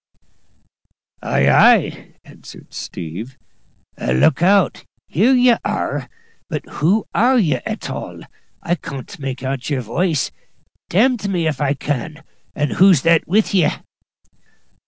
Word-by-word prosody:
"Ay, 70 - +1
ay," - - +3
answered - - -15
"Steve;" 95 +11 -7 0.6
"look 65 - +2
out 195 +1 +3 0.2
here 215 - +2
ye 245 -1 +5
are! - - -3 0.4
But - - -4
who 190 +8 0
are 255 +4 +3
ye 155 - +2
at - - -5
all? - - -7 0.4
I 170 - 0
can't 140 -6 -7
make 135 -2 -5
out 135 0 -3
your 135 -4 -1
woice, 155 - -1 0.6
d 175 - -2
n 250 +4 +4
me 175 -4 -1
if 150 -3 -2
I 145 0 +1
can! 150 +3 -4 0.3
And 145 -1 -1
who's 185 -7 +5
that 165 -1 +3
with 205 +4 +1
ye?" 180 -5 +4
160 Hz, 130 wpm, -19 LUFS, 135-195 Hz, 0.6 s, ye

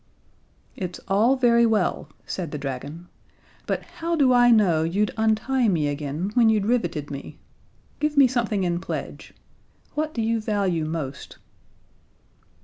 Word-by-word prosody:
'" - - -37 0.3
"It's 180 -2 -5
all 215 +7 +3
very 235 -2 +4
well," 215 -5 0 0.2
said 175 -4 -4
the 150 - -5
dragon, 145 +5 -6 0.6
"but - - -2
how 335 +1 -4
do 270 -5 +4
I 245 0 +5
know 200 -9 +4
you'd 195 +6 0
untie 225 +3 +1
me 165 -7 +1
again 145 +6 -3
when 235 -2 +4
you'd 215 -2 +2
riveted 175 - -1
me? 140 0 -8 0.6
Give 300 -1 -1
me 280 - +8
something 230 -5 -1
in 175 -1 0
pledge. - - -6 0.6
What 310 +1 -2
do 230 - -1
you 225 0 0
value 195 -7 0
most?" 155 -4 -6
205 Hz, 145 wpm, -24 LUFS, 165-235 Hz, 0.6 s, me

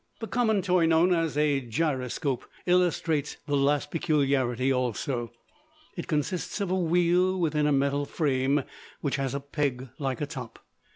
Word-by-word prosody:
The 225 - -4
common 220 -2 +1
toy 180 -2 +3
known 165 +3 +4
as 165 -4 0
a 145 -2 +2
gyroscope 130 0 -2 0.2
illustrates 170 -4 +1
the 145 -1 0
last 145 +1 +1
peculiarity 135 -5 +1
also. 125 -1 -2 0.6
It 170 - -5
consists 160 +6 -2
of 200 -3 -1
a - - +2
wheel 180 +1 +2
within 150 -3 +1
a - - +2
metal 140 +1 +1
frame, 140 -2 +1 0.4
which 140 -1 -1
has 135 0 -2
a - - -1
peg 140 -2 -2
like 135 -3 -2
a 150 - -1
top. 130 -6 -8
145 Hz, 155 wpm, -27 LUFS, 135-170 Hz, 0.6 s, known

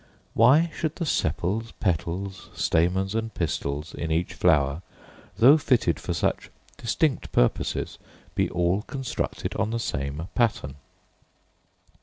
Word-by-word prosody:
Why 145 +9 +5
should 160 -2 -2
the 170 - -3
sepals, 110 - -1
petals, 95 +1 -2
stamens, 90 +4 +1
and 115 0 -2
pistils, 75 -4 -3
in 80 - -4
each 85 +3 0
flower, 70 +2 +2 0.6
though 140 +7 +7
fitted 120 - +2
for - - -4
such - - -1 0.3
distinct 130 +5 -1
purposes, - - 0 0.3
be - - +1
all 90 +3 +1
constructed 135 +3 -4
on 105 - 0
the 115 - -1
same 70 -3 -3
pattern? 100 - 0
95 Hz, 120 wpm, -26 LUFS, 80-115 Hz, 0.6 s, though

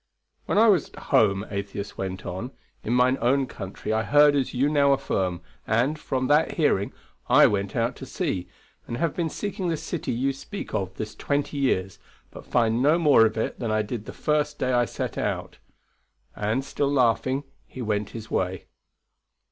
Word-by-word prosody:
When - - 0
I 225 +2 +6
was 190 -8 +3
at - - -17 0.2
home, 100 -1 +4
Atheist 100 0 -5
went 95 -1 -5
on, 95 +7 -4 0.3
in 110 - -3
mine 125 +2 +3
own 135 +3 +3
country 105 -2 -5
I 110 - +2
heard 145 +4 +5
as 135 -3 0
you 130 +3 +1
now 140 -2 +4
affirm, 95 -10 -1 0.3
and, 125 +8 +1
from 130 -3 -2
that 150 +4 +3
hearing, 125 - +1 0.4
I - - +7
went 100 -1 0
out 115 +1 0
to 135 - -8
see, 100 - -2 0.4
and 120 - -4
have 165 +2 -1
been 170 -2 -1
seeking 200 +1 -4
this 160 -2 -2
city 165 0 -3
you 135 +4 0
speak 140 +9 -8
of 95 -1 -2
this 110 +1 -5
twenty 145 0 -2
years, 95 -9 0 0.3
but - - -12
find 115 -1 +2
no 150 +5 +4
more 145 -9 +6
of 110 - -6
it 110 - -2
than 115 - -2
I 110 0 +1
did 110 0 -5
the - - -7
first 150 -1 0
day 130 0 0
I 120 0 +3
set - - -4
out. - - -3 0.8
And, 110 +6 -1
still 140 0 -1
laughing, 130 +1 +2 0.2
he 130 - -7
went 105 -2 -1
his 115 -1 -9
way." 95 0 -1
125 Hz, 190 wpm, -25 LUFS, 105-145 Hz, 0.8 s, I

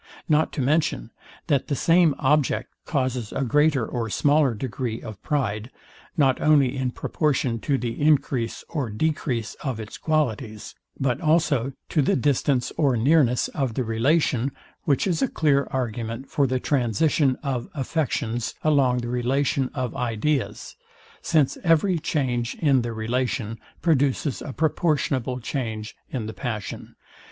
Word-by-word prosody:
Not 155 0 +3
to 145 - -2
mention, 145 - 0 0.3
that 140 -3 +1
the 145 - 0
same 165 +1 +4
object 145 0 +1
causes 130 -6 -1
a - - -1
greater 145 0 +3
or 115 -2 -3
smaller 145 +1 +3
degree 120 0 -3
of 110 -3 -9
pride, 115 -7 -1 0.5
not 135 -4 +3
only 140 -4 +4
in 130 -1 -1
proportion 130 -3 -1
to 140 +4 0
the 120 -1 -4
encrease 135 -6 +1
or 140 -7 -3
decrease 125 -1 -1
of 130 -5 -2
its 110 -1 -8
qualities, 125 -8 -1 0.3
but 130 -1 0
also 155 -5 +2 0.2
to 155 - +2
the 135 - +2
distance 135 -1 +1
or 140 -6 +3
nearness 130 0 +3
of 130 -6 -2
the 130 - 0
relation; 130 +3 +1 0.3
which 140 -3 +2
is 180 -4 0
a 270 - +3
clear 145 - +2
argument 120 0 -4
for 140 -2 +2
the 130 0 0
transition 135 +2 +2
of 130 -4 -2
affections 125 -5 -2
along 135 -5 +3
the 120 - -5
relation 130 +2 0
of 130 -4 -3
ideas; 125 +3 -2 0.5
since 155 -5 +2
every 170 +1 +3
change 125 -6 -1
in 140 -5 +3
the 120 0 -3
relation 115 0 -2 0.2
produces 145 -3 +1
a - - -5
proportionable 145 -4 0
change 110 -4 -4
in 120 -5 -3
the 110 - -5
passion. 110 -5 -5
130 Hz, 145 wpm, -24 LUFS, 120-150 Hz, 0.5 s, same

